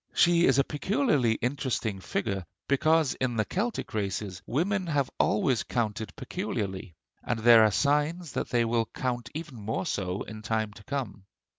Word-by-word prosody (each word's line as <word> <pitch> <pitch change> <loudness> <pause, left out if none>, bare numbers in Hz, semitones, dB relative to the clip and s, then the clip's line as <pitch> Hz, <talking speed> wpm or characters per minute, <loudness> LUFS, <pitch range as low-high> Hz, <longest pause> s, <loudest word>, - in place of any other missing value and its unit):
She 170 0 +5
is 135 - +4
a 140 - +5
peculiarly 150 - +1
interesting 125 -5 -2
figure, 95 0 -2 0.2
because 155 +1 +3
in 130 -2 -2
the 110 -1 +1
Celtic 220 +6 -2
races 100 -2 -3
women 185 - 0
have 145 -5 0
always 115 +2 +2
counted 110 -3 -2
peculiarly; 100 - -4 0.3
and 120 - -1
there 115 0 +7
are 110 - +5
signs 150 - +1
that - - -3
they 120 -2 +2
will 115 -1 +1
count 120 -3 -2
even 150 -5 -6
more 110 - -2 0.4
in 110 -1 -8
time 110 -1 -1
to 105 - -14
come. 125 -9 -4
120 Hz, 155 wpm, -28 LUFS, 110-150 Hz, 0.4 s, there